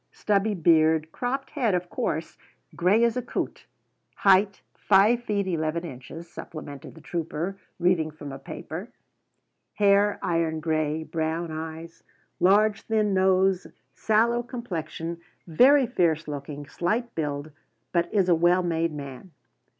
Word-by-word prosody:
Stubby 205 0 0
beard. 160 -2 +3
Cropped 265 +5 -3
head, 235 -10 +1
of 180 0 -2
course. 160 +2 -2 0.4
Grey 195 +7 +3
as 235 -1 +2
a 250 - -1
coot." 245 - -5 0.5
"Height 195 0 +4
5 210 +4 +4
ft. 210 -4 -1
11 165 -1 -2
in.," 130 +3 -9
supplemented 155 -4 -9
the 160 - -13
trooper, 170 +4 -4 0.2
reading 175 -3 +2
from 150 -2 -9
a 135 - -8
paper; 170 - -7 0.9
"'hair 205 0 +4
iron 165 -2 0
grey, 155 0 -1
brown 160 +1 -2
eyes, 160 +1 -7 0.4
large 205 +4 +4
thin 215 -2 0
nose, 190 0 +3 0.3
sallow 230 +2 +2
complexion, 170 - -5 0.2
very 260 - +5
fierce 165 -9 +1
looking, 145 0 -6
slight 220 +10 -2
build, 150 -1 -3 0.4
but 170 -1 0
is 195 -4 +2
a 175 - +5
well 175 +2 +3
made 165 -1 0
man.'" 140 +3 -8
175 Hz, 130 wpm, -26 LUFS, 160-205 Hz, 0.9 s, very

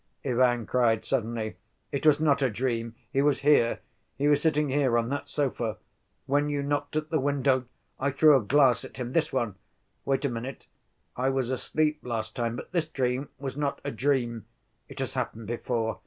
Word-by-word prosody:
Ivan 120 -2 +2
cried 115 -2 +2
suddenly. 115 -3 -2 0.3
"It 140 +2 0
was 150 -1 +6
not 145 -3 +3
a 135 - +3
dream. 115 0 -2 0.2
He 135 - +3
was 145 0 +2
here; 140 -5 +4 0.4
he 145 - +1
was 145 0 +4
sitting 150 -2 +2
here, 135 -3 +2
on 115 0 0
that 140 +1 -3
sofa. 120 -6 -1 0.5
When 145 +2 +1
you 145 -1 -1
knocked 145 +1 -2
at 155 0 -2
the 155 - +2
window, 135 -2 +1 0.3
I 140 - +1
threw 150 +2 +6
a 135 - +4
glass 130 +2 +4
at - - -10
him... 125 -1 -4
this 165 - +1
one. 120 -7 -1 0.5
Wait 135 +1 0
a - - +2
minute. 120 +3 -6 0.5
I 130 +2 +1
was 135 -2 0
asleep 150 +4 0
last 110 -3 -4
time, 115 -1 -1
but - - -8
this 170 -3 0
dream 130 -2 -1
was 135 -1 -5
not 145 -1 -1
a - - -3
dream. 120 -2 0 0.4
It - - -11
has 135 - -3
happened 115 -3 -3
before. 115 0 -2
130 Hz, 190 wpm, -28 LUFS, 120-145 Hz, 0.5 s, was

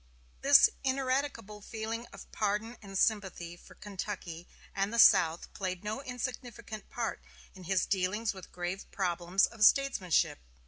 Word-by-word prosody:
This 280 0 +8 0.2
ineradicable 260 -5 -1
feeling 225 +2 -5
of - - -12
pardon 215 +3 -1
and 195 -2 -6
sympathy 190 -5 0
for - - -17
Kentucky 190 -4 -6 0.3
and 195 +1 0
the 235 - -3
South 165 -6 +5
played 185 -1 -4
no 215 +5 -3
insignificant 245 -4 -6
part 235 -1 -3 0.3
in 185 -2 -12
his 185 -1 +1
dealings 205 +4 0
with 190 -1 -12
grave 180 +2 -5
problems 180 0 +1
of 225 -2 -4
statesmanship. 210 - +3
205 Hz, 135 wpm, -31 LUFS, 185-230 Hz, 0.3 s, This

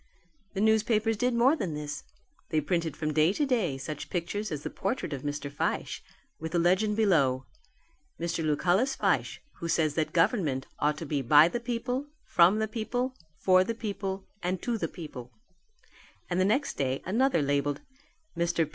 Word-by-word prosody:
The 195 - 0
newspapers 220 0 +3
did 245 +3 +1
more 255 +6 +5
than 175 - -3
this. 145 0 -5 0.5
They 155 - +2
printed 165 -1 -1
from 155 -1 -2
day 155 +4 +4
to 295 - +1
day 220 - 0
such 145 +2 -6
pictures 190 +4 -3
as 150 -1 -4
the - - -4
portrait 195 - -2
of 135 - -4
Mr. 145 0 -3
Fyshe - - -2 0.4
with 160 +1 -5
the - - +2
legend 185 +5 +3
below, 140 -12 +3 0.7
"Mr. 170 -1 -2
Lucullus 180 - +2
Fyshe, - - 0 0.2
who 170 - -3
says 160 -3 +2
that 155 0 -1
government 165 - +1
ought 150 +1 +1
to 165 - -5
be 145 -1 -1
by 145 +5 +7
the 240 - -2
people, 245 +3 -2 0.2
from 175 +4 +5
the 220 0 0
people, 245 +4 -2 0.2
for 185 +3 +5
the 230 +4 -3
people 200 -3 -4 0.2
and 180 +1 -1
to 240 - 0
the 220 - -1
people"; 140 -8 -9 1.0
and 175 - +1
the 185 - +4
next 265 +8 +1
day 135 -1 -1
another 225 - +2
labelled. 145 +1 0 0.5
"Mr. 170 -2 +1
175 Hz, 175 wpm, -29 LUFS, 150-220 Hz, 1.0 s, by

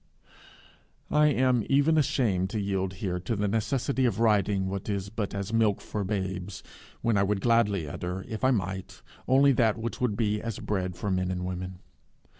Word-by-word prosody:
I 150 0 +5
am 130 -4 +2
even 145 +4 +4
ashamed 105 -11 +1
to 110 - -2
yield 95 -2 -1
here 90 -1 -3
to 100 +6 -2
the 105 0 0
necessity 130 +5 0
of 115 -4 0
writing 105 -3 +2
what 100 +2 -4
is 100 -1 -2
but 105 -1 -4
as 100 +2 -4
milk 110 -3 +3
for 105 - -4
babes, 95 -2 -3 0.4
when 115 -3 +2
I - - +4
would 100 0 +1
gladly 105 -8 +2
utter, 90 +5 -5
if 110 +2 -6
I 130 - +5
might, 95 -6 -3 0.2
only 140 +2 +5
that 115 -4 +2
which 115 +2 -5
would 115 -5 0
be 105 -2 0
as 115 -2 -4
bread 95 -3 -2
for 100 +2 -3
men 90 -1 0
and 90 0 -3
women. 90 0 -5
105 Hz, 185 wpm, -28 LUFS, 95-115 Hz, 0.4 s, I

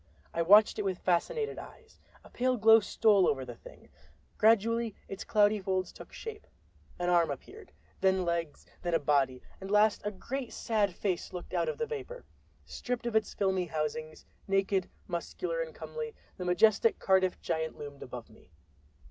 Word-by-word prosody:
I 170 - 0
watched 205 +6 +6
it - - +2
with 190 -3 -1
fascinated 435 - 0
eyes. 450 -1 -14 0.2
A - - -15
pale 255 +1 +1
glow 225 +1 +7
stole 205 -2 +3
over 135 -2 0
the 120 - -7
Thing; - - -15 0.5
gradually 230 0 +3
its 195 - -6
cloudy 210 -1 +3
folds 185 -1 -1
took - - -12
shape—an 430 - -9
arm 170 -2 +4
appeared, 390 - -8 0.3
then 190 -1 +2
legs, 170 -3 -2 0.2
then 175 -1 0
a - - +3
body, 135 -3 +1 0.2
and 195 - -7
last 210 +1 +4
a 210 - -1
great 245 +5 -5
sad 205 -5 0
face 185 -4 -2
looked 180 0 -7
out 170 -2 +1
of - - -4
the 465 - -1
vapor. 470 +2 -7 0.4
Stripped 245 -1 -4
of 235 -2 -2
its 220 -1 +1
filmy 190 -2 +1
housings, 155 0 -4 0.2
naked, 195 -1 +1 0.2
muscular 365 - -3
and - - -6
comely, 465 -1 -6 0.2
the 180 - -6
majestic 205 +5 +4
Cardiff 190 -1 +2
Giant 160 0 -3
loomed 145 -1 -9
above 125 -2 -8
me! 110 -4 -20
195 Hz, 165 wpm, -30 LUFS, 170-225 Hz, 0.5 s, glow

